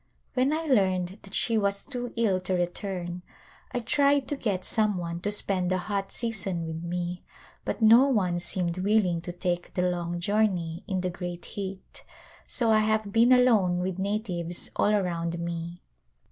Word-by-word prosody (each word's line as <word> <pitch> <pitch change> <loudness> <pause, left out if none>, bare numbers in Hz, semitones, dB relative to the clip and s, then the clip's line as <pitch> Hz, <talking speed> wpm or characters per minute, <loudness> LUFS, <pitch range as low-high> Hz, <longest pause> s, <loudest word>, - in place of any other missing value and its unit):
When 260 +2 +2
I 320 +1 -1
learned 190 - +1
that 195 - -8
she 225 -2 +2
was 200 -1 0
too 245 -3 -4
ill 205 -5 +2
to 185 0 -2
return 175 0 -3 0.5
I 245 - -1
tried 280 +2 +2
to 290 - 0
get 200 -8 -2
some 215 -3 +1
one 170 -1 -4
to 205 - -1
spend 195 -3 +2
the 185 - +1
hot 195 +1 -3
season 195 -7 -2
with 160 0 -5
me 175 +1 -4 0.4
but - - -2
no 230 +5 +8
one 185 -9 +1
seemed 175 0 -2
willing 190 -4 +2
to 175 - -5
take 175 0 -3
the 180 - +1
long 175 -1 -1
journey 180 -4 0
in 190 -3 -1
the 180 0 -1
great 175 0 -6
heat 195 -2 -7 0.4
so 230 -2 +1
I 215 - +5
have 215 -1 +1
been 235 +2 +5
alone 225 -8 +5
with 185 +1 -2
natives 190 -4 -3
all - - +2
around 170 -4 0
me. 170 0 -5
190 Hz, 175 wpm, -27 LUFS, 175-215 Hz, 0.5 s, no